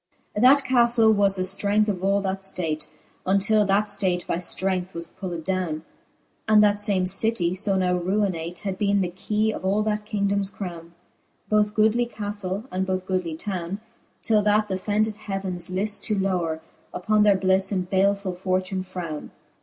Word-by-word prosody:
XXVI. 210 - -1
That 275 +3 +6
ca{lle 235 -3 +5
was 200 -1 +3
the 185 - -1
flrength 200 +3 +1
of 190 -3 -2
all 200 +1 +2
that 195 0 -3
{late, 155 -4 -2 0.4
Untill 205 +2 +3
that 205 +1 +2
Hate 180 -2 0
by - - -1
{Irength 185 +1 -2
was 170 0 -4
pulled 170 -1 -6
downe. 180 -4 -2 0.6
And 215 -1 +6
that 205 0 +3
fame 200 -3 +2
citie, 190 -2 +1
fo 195 +1 -1
now 180 -1 +1
ruinate. 175 -2 -1
Had 195 -2 -4
beene 200 -1 +2
the 180 -2 -1
keye 210 +4 -1
of - - -7
all 200 +3 +1
that 210 0 -1
kingdomes 200 -1 0
crowne; 170 -4 -7 0.6
Both 210 0 +2
goodly 220 +3 +3
ca{lle, 205 -2 -4
and 185 +1 -1
both 185 -1 -2
goodly 185 -4 -2
towne. 185 +1 -4 0.4
Till 215 -2 +3
that 210 0 +2
th'offended 210 +3 0
heavens 195 -4 -4
lift 200 +3 -1
to 215 - 0
lowre 175 -5 -1 0.3
Upon 215 +3 +2
their 205 -2 +5
blifTe, 190 +1 +2
and 185 -3 -1
balefull 195 0 +1
fortune 185 +1 -1
frowne. 180 -5 -6
195 Hz, 170 wpm, -24 LUFS, 185-210 Hz, 0.6 s, That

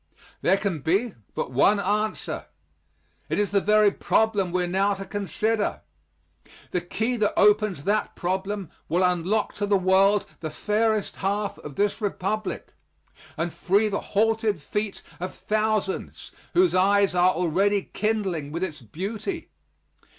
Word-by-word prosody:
There 195 - +4
can 195 -6 -2
be 195 - +1 0.2
but - - -3
one 200 +11 +4
answer. 210 +2 -1 0.8
It - - 0
is 205 -1 +1
the 200 -1 +3
very 210 0 +4
problem 205 -3 +1
we 180 0 +1
are - - -1
now 195 +3 +1
to 195 0 -7
consider. 205 +3 -1 0.9
The 180 - 0
key 225 +7 -2
that 210 -2 0
opens 210 -7 +3
that 210 +4 0
problem 190 +1 -3 0.2
will 175 +4 +2
unlock 180 +4 +1
to 205 - -1
the 200 -1 +4
world 190 +2 +4
the 160 - -4
fairest 215 +3 0
half 200 +1 -2
of 145 -2 -9
this 205 +2 0
Republic, 210 +1 -3 0.6
and 165 +1 -2
free 205 +4 +2
the 200 - -1
halted 220 -2 +1
feet 210 +7 -3 0.2
of 180 +2 -5
thousands 215 -2 -2 0.2
whose 360 +1 +4
eyes 200 +1 +4
are 180 +1 +4
already 190 +4 +2
kindling 195 -9 -1
with 170 +4 -3
its 155 -6 -4
beauty. 205 - -5
200 Hz, 145 wpm, -25 LUFS, 180-215 Hz, 0.9 s, There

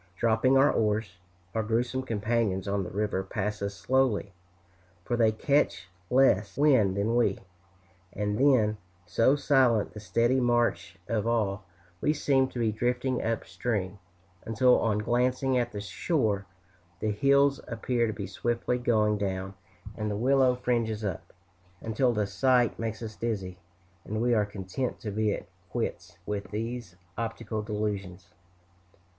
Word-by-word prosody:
Dropping 115 +5 +3
our 135 +2 +5
oars, 105 -4 -1 0.3
our 110 - 0
gruesome 120 +4 -1
companions 110 -4 -1
on 100 0 0
the 90 - -6
river 100 0 -1
pass 105 +2 -3
us 100 0 -3
slowly, 130 -7 +1 0.7
for 120 - 0
they 115 -2 +4
catch 110 -7 0 0.2
less 125 -6 +3
wind 130 -10 +4
than 110 +4 +1
we; 115 -5 +2 0.7
and 105 0 -2
then, 120 -6 +4 0.3
so 130 +9 +3
silent 130 -7 +2
the 105 - -8
steady 115 +6 +1
march 120 -8 +1
of 115 -1 -1
all, 105 -4 0 0.4
we 150 - +2
seem 135 -3 +2
to 130 - -10
be 115 -2 +1
drifting 125 +3 -1
up 115 0 -2
stream, 100 -5 -3 0.4
until 115 +3 +3
on 110 -2 +1
glancing 125 +4 +1
at 120 -1 0
the 105 - -5
shore 100 - -1 0.5
the 110 - 0
hills 140 +5 +3
appear 115 +1 0
to 110 - -2
be 100 -2 -5
swiftly 120 +5 -1
going 105 -3 +2
down 95 -1 -3 0.4
and 105 -1 -3
the 100 - -2
willow 130 +2 +3
fringes 115 -3 -1
up, 90 -3 -5 0.5
until 115 +5 +1
the 105 -3 0
sight 120 +5 +2
makes 115 0 -4
us 110 -1 -6
dizzy, 100 -6 -3 0.4
and 110 +1 -4
we 120 +1 +2
are 105 -2 +2
content 105 +5 -4
to 105 - -5
be 105 +1 +1
at - - -4 0.2
quits 90 -6 -4
with 100 -2 -4
these 115 -2 -5 0.2
optical 115 -1 -3
delusions. 100 -4 -4
110 Hz, 150 wpm, -28 LUFS, 100-125 Hz, 0.7 s, our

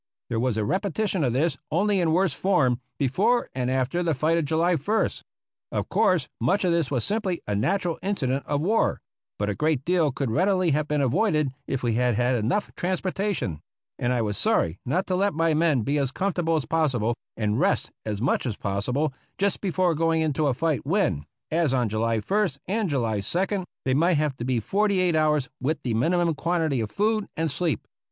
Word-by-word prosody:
There 115 - -1
was 120 -2 0
a 105 - 0
repetition 195 - 0
of 125 -4 +1
this, 145 +2 0
only 200 +4 +2
in 170 -3 +2
worse 180 -1 +2
form, 135 -9 +1 0.2
before 190 - +1
and 125 -1 -1
after 130 +6 0
the 165 -3 +1
fight 155 +5 +2
of 165 -2 +1
July 165 +4 +2
ist. 200 +8 0 0.5
Of - - -2
course 180 -8 +2
much 160 - +1
of 175 - +2
this 170 -4 +1
was 125 -5 -1
simply 200 -5 -1
a 105 - -2
natural 170 - 0
incident 140 -9 -1
of 145 0 0
war, 215 +7 +1 0.4
but 105 - -1
a 105 - 0
great 150 +1 0
deal 170 -4 +2
could 135 -2 -2
readily 185 - +2
have 150 +1 0
been 150 -1 0
avoided 155 - +2 0.2
if 135 -2 -2
we 120 -2 +1
had 125 0 +2
had 125 +3 +2
enough 125 - 0
transportation; 185 - -2 0.4
and 120 - 0
I 120 -2 +1
was 105 -2 -2
sorry 85 +2 +1
not 180 +9 +1
to 185 - -1
let 200 -2 +1
my 165 0 +2
men 155 -6 +2
be 145 +5 0
as 135 -2 +1
comfortable 175 +1 0
as 155 - -1
possible 130 -9 +1 0.2
and 105 +1 0
rest 195 +5 +1
as 105 -2 -3
much 130 +2 0
as 110 - -3
possible 125 +9 -1 0.2
just 200 0 0
before 185 -2 +1
going 165 +1 +1
into 155 -1 +1
a 130 - +1
fight 160 0 0
when, 135 - 0 0.2
as 160 -4 +2
on 120 -3 +1
July 115 +2 0
ist 170 - 0
and 205 0 0
2d, 145 - -1 0.2
they 130 - +2
might 165 +4 +3
have 150 -2 0
to 120 - -4
be 125 -2 +1
forty 200 - +1
eight 180 -3 +2
hours 150 -3 +2
with 150 +5 0
the 120 - -1
minimum 170 +8 +2
quantity 160 -4 0
of 110 -2 -2
food 215 - 0
and 160 -1 0
sleep. 160 +2 -2
155 Hz, 200 wpm, -25 LUFS, 125-180 Hz, 0.5 s, might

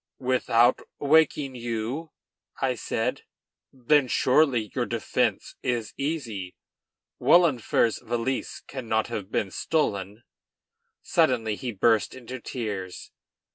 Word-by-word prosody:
"Without 125 -2 +3 0.2
awaking 145 -2 +3
you?" 120 +6 -4 0.5
I - - +1
said. - - -2 0.5
"Then 135 +2 +2
surely 125 - +2
your - - -1
defence - - -1
is 120 -3 -2
easy; 120 - -4 0.6
Wahlenfer's 130 -9 +3
valise 120 +2 -3
cannot 115 -5 -2
have 105 -3 -5
been 95 - -1
stolen." 105 -8 -1 0.8
Suddenly 115 -4 +2
he 125 +3 -4
burst 110 +2 +2
into 130 0 -8
tears. 105 -7 -5
120 Hz, 95 wpm, -26 LUFS, 110-135 Hz, 0.8 s, Without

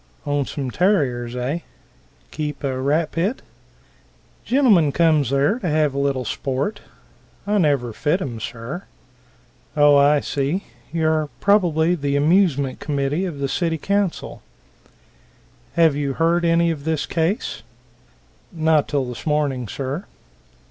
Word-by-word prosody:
"Own 145 -1 0
some 135 -4 -4
terriers, 125 - +1
eh? 130 +7 -2 0.7
Keep 150 -2 -4
a 130 -2 -2
rat 150 +4 +1
pit?" 190 +10 -1 1.0
"Gentlemen 220 - +4
comes 155 -5 +3
there 140 - +2
to 180 - -2
have 150 -2 +2
a 140 - -2
little 135 -2 0
sport. 135 - -2 0.7
I 205 0 +1
never 140 - +1
fit 150 - 0
'em, 120 - -5
sir." 120 - -6 0.9
"Oh, 145 -1 +6
I 145 +1 +5
see 145 +7 -2 0.3
you 160 -1 0
are 155 -1 +1
probably 175 -5 +3
the 140 -4 -1
amusement 145 -3 +2
committee 145 +4 -1
of 170 -6 -5
the 140 0 -1
city 165 +2 -1
council. 200 +2 -2 1.3
Have 165 -4 +4
you 140 -2 -2
ever - - -16
heard 170 +1 +2
of 165 -3 +2
this 160 -1 -1
case?" 175 +8 -1 0.9
"Not 160 -3 +2
till 140 -3 0
this 125 +4 -7
morning, 145 -5 0
sir." 140 - -4
150 Hz, 135 wpm, -21 LUFS, 140-170 Hz, 1.3 s, Oh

